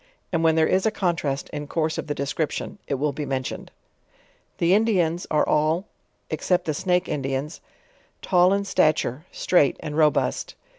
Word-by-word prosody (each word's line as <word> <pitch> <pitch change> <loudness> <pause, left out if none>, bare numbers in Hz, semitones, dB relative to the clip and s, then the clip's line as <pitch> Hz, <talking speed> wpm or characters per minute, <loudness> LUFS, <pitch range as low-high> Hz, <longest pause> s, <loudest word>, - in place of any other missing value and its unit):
And; 165 -1 +1
when 160 -1 +4
there 160 -1 +4
is 190 +5 +2
a - - +5
contrast 170 -9 -1
in 150 -1 -6
course 160 0 -1
of - - -5
the 145 - -2
description, 145 +7 -3
it 140 - 0
will 145 +2 0
be 150 - -5
mentioned. 130 -2 -4 0.9
The 170 +2 +3
Indians 185 -6 +2
are 150 - +2
all 155 +5 +1 0.5
(except 180 -1 0
the 155 - -1
Snake 180 +3 0
Indians) 135 +1 -3 0.6
tall 180 -1 +4
in 200 0 +1
sta 155 -5 +4
ture, 145 +1 -4
straight 145 -7 +2
and 150 -1 -6
robust. 155 -1 +1
160 Hz, 165 wpm, -24 LUFS, 150-180 Hz, 0.9 s, a